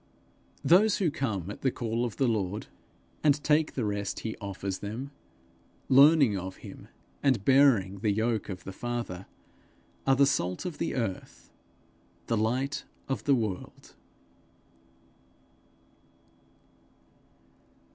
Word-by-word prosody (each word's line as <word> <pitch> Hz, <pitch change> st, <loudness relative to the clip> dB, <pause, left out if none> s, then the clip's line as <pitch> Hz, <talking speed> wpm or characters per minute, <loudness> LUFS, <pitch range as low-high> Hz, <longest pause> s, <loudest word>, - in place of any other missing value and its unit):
Those 200 Hz, +5 st, +5 dB
who 175 Hz, -6 st, +1 dB
come 100 Hz, -, -3 dB
at -, -, -10 dB
the 135 Hz, -, +2 dB
call 120 Hz, -1 st, -2 dB
of 120 Hz, -, -5 dB
the 135 Hz, -, +2 dB
Lord, 105 Hz, -3 st, -1 dB, 0.6 s
and 145 Hz, -2 st, +5 dB
take 150 Hz, +1 st, +2 dB
the 125 Hz, -, -1 dB
rest 100 Hz, -1 st, -3 dB
he 110 Hz, -, -4 dB
offers 100 Hz, -1 st, -4 dB
them, 115 Hz, +7 st, -6 dB, 0.8 s
learning 140 Hz, -3 st, +6 dB
of 95 Hz, 0 st, -5 dB
him, -, -, -11 dB, 0.3 s
and 130 Hz, -8 st, +2 dB
bearing 125 Hz, -9 st, +4 dB
the 105 Hz, -, 0 dB
yoke 110 Hz, +1 st, -1 dB
of 95 Hz, -2 st, -6 dB
the 95 Hz, -, -7 dB
Father, 120 Hz, -6 st, -5 dB, 0.8 s
are 135 Hz, -, +5 dB
the 140 Hz, +1 st, +5 dB
salt 90 Hz, -, -1 dB
of 175 Hz, -4 st, -5 dB
the -, -, -2 dB
earth, 115 Hz, -7 st, -5 dB, 0.7 s
the 115 Hz, -, 0 dB
light 125 Hz, +6 st, -1 dB, 0.2 s
of 130 Hz, -6 st, -3 dB
the 140 Hz, -, +4 dB
world. 110 Hz, -6 st, -5 dB
115 Hz, 125 wpm, -28 LUFS, 100-135 Hz, 0.8 s, learning